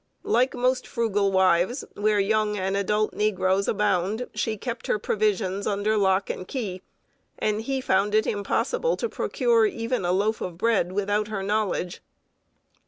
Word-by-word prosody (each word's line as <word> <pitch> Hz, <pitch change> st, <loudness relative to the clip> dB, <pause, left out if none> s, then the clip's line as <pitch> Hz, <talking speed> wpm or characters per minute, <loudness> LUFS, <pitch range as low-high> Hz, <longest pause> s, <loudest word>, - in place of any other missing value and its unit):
Like 250 Hz, +4 st, +2 dB
most 255 Hz, +1 st, 0 dB
frugal 210 Hz, -5 st, 0 dB
wives, 190 Hz, -, +2 dB
where 210 Hz, 0 st, +1 dB
young 210 Hz, +1 st, +1 dB
and 190 Hz, 0 st, -1 dB
adult 210 Hz, +2 st, 0 dB
negroes 195 Hz, -2 st, +1 dB
abound, 210 Hz, +3 st, 0 dB
she 215 Hz, 0 st, -2 dB
kept 235 Hz, +2 st, -5 dB
her -, -, +2 dB
provisions 205 Hz, -2 st, 0 dB
under 210 Hz, +1 st, 0 dB
lock 195 Hz, -1 st, +2 dB
and 185 Hz, -, -5 dB
key, 200 Hz, -9 st, -4 dB, 0.6 s
and 215 Hz, 0 st, 0 dB
he 265 Hz, +3 st, -2 dB
found 205 Hz, -2 st, +1 dB
it 215 Hz, -, +3 dB
impossible 485 Hz, -, 0 dB
to 470 Hz, -, -1 dB
procure 460 Hz, 0 st, +2 dB
even 230 Hz, -, -2 dB
a 175 Hz, -, +1 dB
loaf 205 Hz, +4 st, 0 dB
of 175 Hz, -2 st, -5 dB
bread 220 Hz, -3 st, +1 dB
without 205 Hz, +2 st, 0 dB
her 210 Hz, -3 st, -4 dB
knowledge. 200 Hz, -3 st, -1 dB
210 Hz, 155 wpm, -25 LUFS, 195-225 Hz, 0.6 s, it